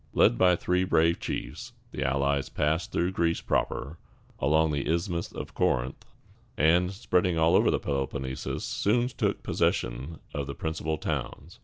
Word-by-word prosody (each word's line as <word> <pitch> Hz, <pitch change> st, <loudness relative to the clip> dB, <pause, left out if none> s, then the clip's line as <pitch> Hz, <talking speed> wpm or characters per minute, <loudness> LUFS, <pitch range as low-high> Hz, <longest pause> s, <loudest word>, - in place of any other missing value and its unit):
Led -, -, +5 dB
by 90 Hz, +7 st, +5 dB
three 90 Hz, +1 st, +1 dB
brave 85 Hz, -2 st, +3 dB
chiefs, -, -, -5 dB, 0.2 s
the -, -, -3 dB
allies 70 Hz, +1 st, +1 dB
passed 80 Hz, +3 st, 0 dB
through 90 Hz, +2 st, 0 dB
Greece 85 Hz, -2 st, +1 dB
proper, 75 Hz, +5 st, -2 dB, 0.4 s
along 80 Hz, +3 st, +3 dB
the 70 Hz, +1 st, -1 dB
Isthmus 85 Hz, 0 st, -1 dB
of -, -, -7 dB
Corinth, 65 Hz, +2 st, 0 dB, 0.5 s
and, 85 Hz, +5 st, +4 dB
spreading 90 Hz, -4 st, +1 dB
all 80 Hz, +1 st, +4 dB
over -, -, +5 dB
the -, -, +2 dB
Peloponnesus, 65 Hz, -1 st, -3 dB
soon 120 Hz, +4 st, +1 dB
took 120 Hz, -, -1 dB
possession 65 Hz, +7 st, -1 dB, 0.2 s
of 70 Hz, -1 st, -3 dB
the 70 Hz, -, -5 dB
principal 80 Hz, 0 st, -2 dB
towns. 80 Hz, +3 st, -5 dB
80 Hz, 150 wpm, -28 LUFS, 70-90 Hz, 0.5 s, Led